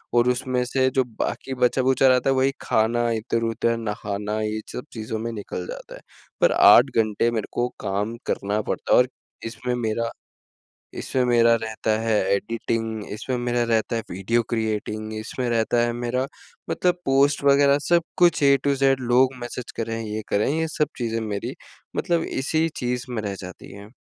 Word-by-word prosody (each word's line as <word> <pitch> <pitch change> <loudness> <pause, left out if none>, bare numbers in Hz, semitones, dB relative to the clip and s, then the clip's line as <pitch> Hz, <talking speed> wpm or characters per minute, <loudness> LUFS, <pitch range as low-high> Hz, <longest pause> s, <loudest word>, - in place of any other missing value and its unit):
और 120 +1 +4
उसमें 125 0 0
से 130 +1 +1
जो 130 - +4 0.2
बाकी 135 - -2
बचा-खुचा 130 +2 +3
रहता 130 0 +4
है 135 - +3
वही 135 +1 +3
खाना 120 +2 +1
इधर-उधर 115 0 0
नहाना 105 -1 -3
ये 110 0 -2
सब 125 - -6
चीज़ों 110 -1 -4
में 115 +1 -3
निकल 100 -4 -6
जाता - - -8
है, - - -13 0.4
पर - - +5
8 120 +6 +7
घंटे 110 +1 +2
मेरे 110 -3 -2
को 120 +1 +1
काम 100 +4 -2
करना 105 +2 -1
पड़ता - - -4
है - - +7
और 125 - +4 0.4
इसमें 125 +2 -3
मेरा 115 -1 -1 0.9
इसमें 130 -1 0
मेरा 115 -1 +5
रहता 110 0 -2
है 115 0 0 0.2
एडिटिंग 115 0 -3
इसमें 125 +4 -3
मेरा 120 0 0
रहता 110 +1 +1
है 115 - -3
वीडियो 115 +6 0
क्रिएटिंग 110 -1 -2
इसमें 120 +3 -3
रहता 115 +1 +1
है 120 - -1
मेरा 120 +2 -1 0.4
मतलब 180 0 +1
पोस्ट 140 +1 +3
वगैरह 140 0 +5
सब 170 -1 +4
कुछ 175 -4 +4
ए 140 0 +6
टू 140 -1 +3
ज़ेड 135 -1 +3
लोग 130 +1 +4
मैसेज 120 0 -6
कर 115 0 -2
रहे 115 0 -3
हैं। 115 - -5
ये 105 +1 -3
कर 100 - +2
रहे 110 - +1
हैं 160 - -1
ये 160 - 0
सब 150 -2 +2
चीज़ें 115 -1 -1
मेरी 100 -1 -4 0.4
मतलब 170 -1 +1 0.2
इसी 160 +4 +1
चीज़ 125 0 -2
में 115 - -2
रह 100 -1 -3
जाती 90 +1 -10
हैं। 100 +1 -11
115 Hz, 185 wpm, -24 LUFS, 110-130 Hz, 0.9 s, 8